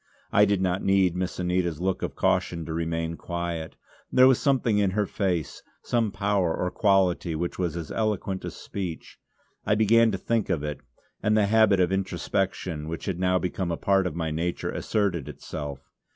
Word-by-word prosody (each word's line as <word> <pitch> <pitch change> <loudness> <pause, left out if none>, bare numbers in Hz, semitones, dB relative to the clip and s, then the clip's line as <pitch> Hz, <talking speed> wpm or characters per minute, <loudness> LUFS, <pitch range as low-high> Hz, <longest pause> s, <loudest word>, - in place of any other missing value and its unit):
I 105 - +6
did 100 -2 +1
not 95 +1 0
need 95 -3 +3
Miss 90 0 -3
Anita's 90 -3 0
look 95 +1 -1
of - - -3
caution 85 -2 0
to 80 - -4
remain 80 0 -2
quiet; 85 -2 -4 0.4
there 130 - +6
was 130 -2 +4
something 125 -6 +2
in 100 -2 +3
her 105 - +3
face, 90 -6 -2 0.2
some 115 -3 0
power 100 -4 +1
or 90 - -1
quality 95 -5 +2
which 85 +3 -3
was 85 -2 -1
as 85 -2 -6
eloquent 100 -3 -1
as - - -6
speech. 90 -5 -6 0.4
I 105 - +2
began 115 +2 +5
to 95 - -2
think 115 +2 -1
of 85 -6 0
it; 75 -2 -4 0.4
and 105 +2 +2
the 105 - +4
habit 105 -2 +4
of 90 0 +3
introspection, 90 -4 -2
which 85 0 -5
had 95 -3 -2
now 90 0 +2
become 90 0 -2
a 85 - -1
part 95 -1 +2
of 80 - -5
my 80 -2 -2
nature, 85 +3 -2
asserted 95 -9 -1
itself. 70 -3 -7
90 Hz, 185 wpm, -26 LUFS, 85-100 Hz, 0.4 s, I